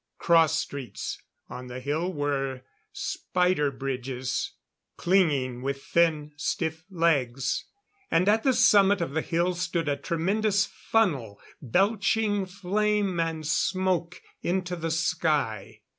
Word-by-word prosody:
Cross 165 Hz, -2 st, +4 dB
streets 130 Hz, -8 st, -5 dB, 0.3 s
on 125 Hz, +1 st, -8 dB
the 125 Hz, +1 st, -6 dB
hill 155 Hz, +7 st, -1 dB
were 135 Hz, -4 st, -2 dB, 0.3 s
spider 180 Hz, -5 st, 0 dB
bridges, 130 Hz, -1 st, -3 dB, 0.4 s
clinging 145 Hz, -10 st, +2 dB
with 140 Hz, +1 st, -3 dB
thin, 155 Hz, -3 st, +1 dB
stiff 160 Hz, +1 st, -2 dB
legs. 135 Hz, -8 st, 0 dB, 0.4 s
And 170 Hz, +3 st, +2 dB
at 215 Hz, +2 st, +4 dB
the 265 Hz, +1 st, +3 dB
summit 205 Hz, -5 st, +5 dB
of 170 Hz, -4 st, -2 dB
the 160 Hz, +2 st, 0 dB
hill 175 Hz, +2 st, 0 dB
stood 170 Hz, -2 st, -2 dB
a 145 Hz, -, +1 dB
tremendous 200 Hz, +6 st, +1 dB
funnel 145 Hz, -, -1 dB, 0.2 s
belching 205 Hz, -, +1 dB
flame 200 Hz, 0 st, 0 dB
and 165 Hz, -1 st, -2 dB
smoke 180 Hz, +1 st, 0 dB, 0.2 s
into 180 Hz, 0 st, -1 dB
the 165 Hz, -1 st, -3 dB
sky. 140 Hz, -, -1 dB
165 Hz, 115 wpm, -27 LUFS, 140-185 Hz, 0.4 s, summit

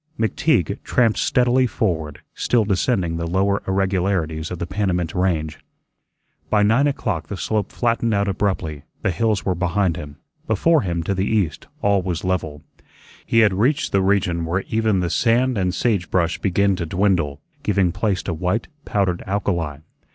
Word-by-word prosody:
McTeague 110 Hz, -, +1 dB
tramped 115 Hz, -3 st, +2 dB
steadily 125 Hz, 0 st, +3 dB
forward, 85 Hz, -, -2 dB
still 115 Hz, -3 st, +1 dB
descending 95 Hz, -4 st, 0 dB
the 85 Hz, 0 st, -3 dB
lower 95 Hz, +3 st, +1 dB
irregularities 95 Hz, -4 st, 0 dB
of 90 Hz, -, -5 dB
the 85 Hz, -, -3 dB
Panamint 90 Hz, -4 st, -1 dB
Range. 80 Hz, -4 st, -1 dB, 0.9 s
By 105 Hz, -1 st, +3 dB
nine 115 Hz, +8 st, +4 dB
o'clock 110 Hz, -, -2 dB
the 100 Hz, -, -5 dB
slope 105 Hz, +1 st, -1 dB
flattened 115 Hz, -1 st, 0 dB
out 100 Hz, -1 st, +1 dB
abruptly; 95 Hz, -7 st, -1 dB, 0.2 s
the -, -, +2 dB
hills 110 Hz, +3 st, 0 dB
were 95 Hz, -, +2 dB
behind 90 Hz, 0 st, 0 dB
him; 75 Hz, -3 st, -8 dB, 0.3 s
before 150 Hz, -, +3 dB
him, 85 Hz, -3 st, -2 dB
to 100 Hz, -, -1 dB
the 95 Hz, +1 st, -1 dB
east, 100 Hz, -8 st, -1 dB, 0.2 s
all 100 Hz, -1 st, +3 dB
was 90 Hz, -3 st, -3 dB
level. 80 Hz, -5 st, -2 dB, 0.6 s
He 115 Hz, -, +4 dB
had 105 Hz, -3 st, +4 dB
reached 130 Hz, +11 st, +1 dB
the 95 Hz, -, +3 dB
region 95 Hz, -3 st, +1 dB
where 85 Hz, +4 st, -1 dB
even 110 Hz, -4 st, +1 dB
the 85 Hz, -, -1 dB
sand 125 Hz, +2 st, +2 dB
and 90 Hz, -3 st, 0 dB
sage 100 Hz, -2 st, 0 dB
brush 85 Hz, -2 st, 0 dB
begin 100 Hz, +1 st, +2 dB
to 85 Hz, -, -3 dB
dwindle, 90 Hz, -6 st, +1 dB, 0.2 s
giving 90 Hz, -3 st, +1 dB
place 100 Hz, 0 st, -1 dB
to 85 Hz, -, -2 dB
white, 90 Hz, -, -1 dB, 0.2 s
powdered 95 Hz, -4 st, 0 dB
alkali. 85 Hz, -7 st, -2 dB
95 Hz, 165 wpm, -21 LUFS, 85-105 Hz, 0.9 s, nine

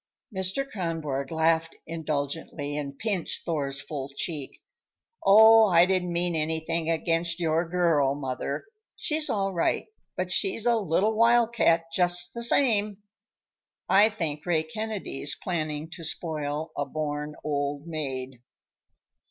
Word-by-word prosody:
Mr. 190 Hz, +9 st, 0 dB
Kronborg 160 Hz, -, -3 dB
laughed 165 Hz, 0 st, +1 dB
indulgently 150 Hz, -2 st, -4 dB
and 140 Hz, -2 st, -5 dB
pinched 200 Hz, -1 st, -3 dB
Thor's 140 Hz, -4 st, -1 dB
full 140 Hz, -1 st, -5 dB
cheek. 140 Hz, 0 st, -5 dB, 0.6 s
"Oh, 220 Hz, +2 st, +8 dB
I 175 Hz, -2 st, +5 dB
didn't 185 Hz, -1 st, 0 dB
mean 170 Hz, 0 st, 0 dB
anything 160 Hz, +1 st, -1 dB
against 165 Hz, +1 st, 0 dB
your 165 Hz, 0 st, 0 dB
girl, 165 Hz, -6 st, +2 dB
mother! 135 Hz, -, -4 dB, 0.3 s
She's 305 Hz, 0 st, 0 dB
all 195 Hz, -2 st, -1 dB
right, 170 Hz, -, 0 dB, 0.3 s
but -, -, -2 dB
she's 380 Hz, -, +1 dB
a 240 Hz, -1 st, +4 dB
little 205 Hz, +1 st, +1 dB
wild 235 Hz, +1 st, +4 dB
cat, 165 Hz, -7 st, +3 dB
just 175 Hz, -1 st, +3 dB
the 235 Hz, -, -5 dB
same. 215 Hz, -5 st, +3 dB, 0.8 s
I 205 Hz, +3 st, +5 dB
think 160 Hz, -8 st, -4 dB
Ray 165 Hz, -3 st, +1 dB
Kennedy's 200 Hz, -6 st, -3 dB
planning 155 Hz, -3 st, -3 dB
to 170 Hz, -, -8 dB
spoil 155 Hz, -1 st, -3 dB
a 145 Hz, -, -1 dB
born 150 Hz, 0 st, -4 dB
old 145 Hz, 0 st, -2 dB
maid." 135 Hz, -6 st, -5 dB
165 Hz, 125 wpm, -26 LUFS, 150-190 Hz, 0.8 s, Oh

